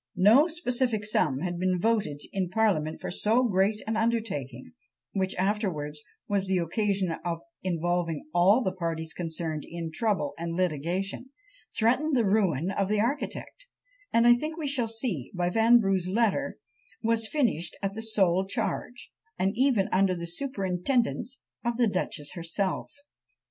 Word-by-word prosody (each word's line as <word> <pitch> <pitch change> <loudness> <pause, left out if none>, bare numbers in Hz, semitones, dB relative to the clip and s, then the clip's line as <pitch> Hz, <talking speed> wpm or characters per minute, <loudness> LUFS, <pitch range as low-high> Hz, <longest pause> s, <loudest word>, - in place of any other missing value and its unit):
No 220 - +6
specific 250 -9 0
sum 150 -10 +1
had 175 -1 -3
been 185 0 +1
voted 200 -9 0
in 190 -3 -1
parliament 180 -7 +1
for - - -5
so 220 +7 +2
great 205 -1 +1
an 220 - -1
undertaking; 210 - -2 0.4
which 190 -1 -1
afterwards 185 -7 -1 0.3
was 200 -1 0
the 190 0 +2
occasion 190 +1 0
of 170 -1 -3 0.2
involving 175 -2 -1
all 195 +8 +5
the 190 - 0
parties 165 -3 -3
concerned 160 -2 -4
in 165 -1 -6
trouble 165 -6 0
and 170 0 -3
litigation; 180 - -2 0.5
threatened 255 +7 +2
the 235 - +3
ruin 190 -5 +2
of 195 0 -1
the 210 0 +2
architect; 285 - -3 0.4
and 230 0 +4
I 240 - +9
think 305 +6 -3
we 310 -3 -3
shall 265 -4 +1
see, 225 - -2
by 175 0 0
Vanbrugh's 220 -4 +4
letters, 230 +7 +1 0.5
was 225 0 +2
finished 220 - 0
at 195 0 -1
the 220 - -5
sole 190 -4 +2
charge, 240 +3 -3 0.3
and 190 +1 +1
even 245 -6 +3
under 185 0 +3
the 170 -1 -5
superintendence, 235 +4 -1 0.2
of 235 -1 -1
the 245 - +4
duchess 180 -7 -2
herself! 180 +2 -2
195 Hz, 150 wpm, -28 LUFS, 175-230 Hz, 0.5 s, I